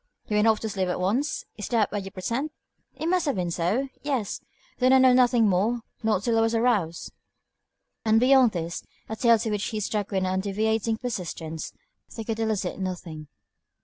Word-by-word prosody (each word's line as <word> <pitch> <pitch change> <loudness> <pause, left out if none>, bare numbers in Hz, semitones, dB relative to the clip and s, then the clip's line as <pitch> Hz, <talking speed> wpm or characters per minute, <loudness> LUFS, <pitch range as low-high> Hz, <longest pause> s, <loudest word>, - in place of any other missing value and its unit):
"You 210 - -2
went 210 +2 +4
off 220 -1 +4
to 220 - -3
sleep 190 -2 -1
at 180 - -2
once? 230 +11 0
Is 210 - -5
that 225 -3 +1
what 205 -1 -2
you 195 - -7
pretend?" 230 +10 -3 0.5
"It - - -5
must 355 -1 +1
have 280 - +1
been 180 -2 -2
so. 190 +11 0
Yes. 265 -8 -2 0.4
Then 255 +1 +4
I - - +8
know 260 -1 +6
nothing 245 -3 +4
more, 210 +6 +1 0.2
not 215 -4 +1
till 230 -1 +2
I - - +4
was 225 +1 +1
aroused." 215 -9 0 0.9
And 220 0 +4
beyond 255 -1 +5
this, 170 -1 -4 0.2
a 220 - -4
tale 230 0 +4
to 220 0 -2
which 210 -1 -1
he 215 - -3
stuck 210 0 -2
with 190 -2 0
undeviating 210 +4 0
persistence, 170 -9 -5 0.4
they 225 - -5
could 225 0 -3
elicit 210 -5 -1
nothing. 175 -5 -5
220 Hz, 190 wpm, -26 LUFS, 190-235 Hz, 0.9 s, I